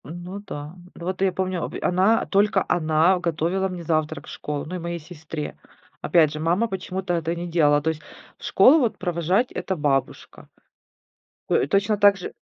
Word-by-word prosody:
Ну, 175 +5 -7
да. 150 0 -7 0.2
Вот 185 +2 -5
я 195 -1 +3
помню 185 -1 -2
обе - - -5
она, 190 +5 +2
только 200 -1 +2
она 165 +2 +3
готовила 175 +3 -1
мне 180 -2 -6
завтрак 155 -2 -1
в - - -9
школу, 145 -1 -5
ну 180 - -6
и - - -4
моей 170 0 -4
сестре. 155 -1 -7 0.4
Опять 160 -4 +3
же, 155 - -5
мама 175 +8 +1
почему-то 190 -2 -4
это 165 0 -1
не 175 +1 -5
делала. 150 -4 +3
То 160 - 0
есть, 155 -1 -9 0.4
в - - -18
школу 265 +11 +6
вот 240 -6 0
провожать- 180 +6 0
это 190 - -3
бабушка. 145 -4 -2 1.0
Той - - +2
точно 205 +5 +1
также 200 -2 +3
175 Hz, 175 wpm, -23 LUFS, 160-190 Hz, 1.0 s, школу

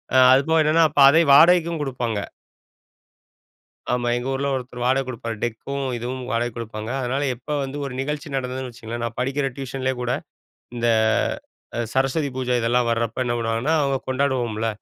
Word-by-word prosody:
அ - - +7 0.2
அது 135 +2 +4
போக 160 0 +4
என்னன்னா, 160 +2 +4
அப்ப 145 - +2
அதையும் 160 -1 +4
வாடகைக்கும் 170 0 +5
குடுப்பாங்க. 120 -5 -2 1.7
ஆமா, 120 -1 0
எங்க 120 +2 -3
ஊர்ல 140 +1 -1
ஒருத்தர் 125 -1 -6
வாடகை 130 +2 +2
குடுப்பார், 115 -2 -5
டெக்கும் 135 +4 -3
இதுவும் 125 +2 -5
வாடகை 120 +1 0
குடுப்பாங்க. 110 -1 -6
அதனால 135 +3 -1
எப்ப 125 +4 -22 0.2
வந்து 135 +1 -6
ஒரு 135 - -6
நிகழ்ச்சி 150 +2 -4
நடந்ததுன்னு 130 0 -4
வச்சுக்கோங்களேன், 120 0 -6
நான் 115 -1 -4
படிக்கிற 135 +2 0
டியூஷன்லேயே 130 -1 -3
கூட 125 - -1 0.6
இந்த 120 0 0 0.9
அ - - 0
சரஸ்வதி 135 +3 +1
பூஜை 125 -1 0
இதெல்லாம் 120 +1 +1
வர்றப்ப 115 +2 -1
என்ன 120 - -1
பண்ணுவாங்கன்னா, 115 +7 0
அவங்க 140 -1 +1
கொண்டாடுவோம்ல. 125 -5 0
130 Hz, 160 wpm, -22 LUFS, 120-140 Hz, 1.7 s, அ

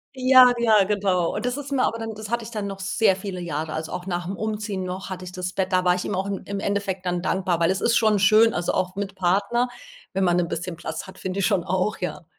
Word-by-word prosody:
Ja, 255 -1 +7
ja, 220 -3 +5
genau. 190 -4 0
Und 220 - -3
das 250 0 0
ist 285 0 -7
mir 270 -2 +2
aber 230 - 0
dann 225 -1 -5
das 215 0 -8
hatte 235 0 -1
ich 225 - -9
dann 210 -3 -3
noch 195 -1 -7
sehr 195 +1 +2
viele 190 -1 -6
Jahre, 160 -2 -4
also 160 0 -4
auch 180 0 -5
nach 175 -1 -3
'm 195 - -3
Umziehen 210 -2 -3
noch 185 +1 -5
hatte 185 -1 -6
ich 180 - -8
das 180 0 -5
Bett. 190 -1 -1
Da 185 0 +2
war 180 - +4
ich 180 - -3
ihm 205 - -2
auch 190 +1 -1
im 200 -1 -3
im 200 0 -4
Endeffekt 200 -2 -2
dann 175 -1 -1
dankbar, 180 -2 0
weil 165 - +4
es 190 - -1
ist 230 +3 +2
schon 215 -3 +3
schön, 215 +3 +5
also 175 - -1
auch 185 0 -1
mit 200 -1 -4
Partner, 200 +7 +1 0.4
wenn 190 0 0
man 175 0 +3
'n 175 -1 0
bisschen 170 +1 -4
Platz 170 - -6
hat, 190 - -12
finde 185 +1 -4
ich 195 - +2
schon 195 -5 +2
auch, 185 +3 -1
ja. 180 -1 -4
190 Hz, 275 wpm, -24 LUFS, 180-215 Hz, 0.4 s, Ja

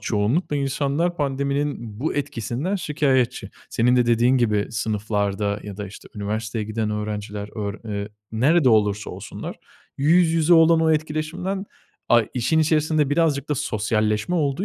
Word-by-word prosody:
çoğunlukla 120 - 0
insanlar 140 +5 0
pandeminin 140 -5 -2
bu 155 - -1
etkisinden 140 - -2
şikâyetçi. 140 -7 0 0.2
Senin 125 +2 +3
de 125 -1 +3
dediğin 120 +2 +4
gibi 105 -4 +1
sınıflarda 105 -1 -1
ya 100 -2 -8
da 105 -1 -5
işte, 100 - -12
üniversiteye 110 +2 -3
giden 110 0 -2
öğrenciler 105 -1 -4
ör 100 -1 -3
eee, 100 -1 -4 0.2
nerede 135 +6 +3
olursa 105 -2 +2
olsunlar, - - -7 0.4
yüz 165 +4 +4
yüze 165 +1 +4
olan 165 0 +6
o 160 0 +3
etkileşimden, 160 +5 -2 0.4
ay 120 -2 +4
işin 130 +6 +1
içerisinde 155 -2 +2
birazcık 150 -3 +1
da 150 - +1
sosyalleşme 110 - 0
olduğu 150 +2 0
125 Hz, 140 wpm, -23 LUFS, 105-155 Hz, 0.4 s, olan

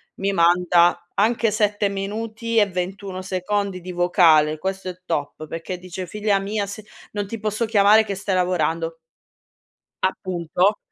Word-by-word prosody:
mi 195 +1 -1
manda 175 0 +3
anche 225 +1 +2
7 210 -1 +1
minuti 220 +4 -3
e 210 - +6
21 185 +1 -4
secondi 190 0 -2
di 180 - -7
vocale. 170 -4 +4
Questo 190 +2 -4
è 180 0 -8
top, 155 -1 -3
perché 165 +3 -5
dice: 180 0 -7
"Figlia 210 +1 0
mia 200 +1 -2
se 200 +2 -8 0.3
non 205 -1 -3
ti 225 +2 -6
posso 215 +2 -1
chiamare 215 0 +5
che 200 -2 -4
stai 195 0 -2
lavorando". 165 -2 0 1.1
Appunto, 185 +1 0
190 Hz, 145 wpm, -22 LUFS, 175-205 Hz, 1.1 s, e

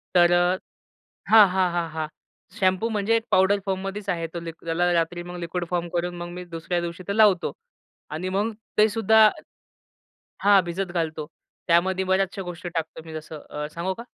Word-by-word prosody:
तर 175 -1 +6
अ 175 +1 +3 0.7
हां, 215 -2 +9
हां, 185 -1 +1
हां, 170 -1 -1
हां. 155 0 -3 0.5
शॅम्पू 190 +4 +2
म्हणजे 215 +1 +1
एक 225 - +1
पावडर 190 +2 +4
फॉर्ममध्येच 195 +1 -3
आहे 165 -2 -1
तो 170 - -3
त्याला 165 +2 -1
रात्री 175 +1 0
मग 175 0 -8
लिक्विड 170 +1 -3
फॉर्म 175 -1 -1
करून 175 0 -1
मग 175 0 -5
मी 180 +1 -7
दुसऱ्या 170 +1 -3
दिवशी 170 +2 -6
तो 200 - -1
लावतो. 205 -5 +4 0.6
आणि 170 +5 -4
मग 205 +4 0 0.3
ते 215 +1 +6
सुद्धा 220 0 +5 1.1
हां, 200 -1 +6
भिजत 175 +2 -3
घालतो. 160 -3 -2 0.4
त्यामध्ये 185 +3 +2
बऱ्याचश्या 190 +1 0
गोष्टी 175 0 -6
टाकतो 160 0 -3
मी 160 - -9
जसं 155 -1 -8
अ, 150 0 -4
सांगू 175 +3 -2
का? 230 - -9
180 Hz, 175 wpm, -24 LUFS, 170-195 Hz, 1.1 s, हां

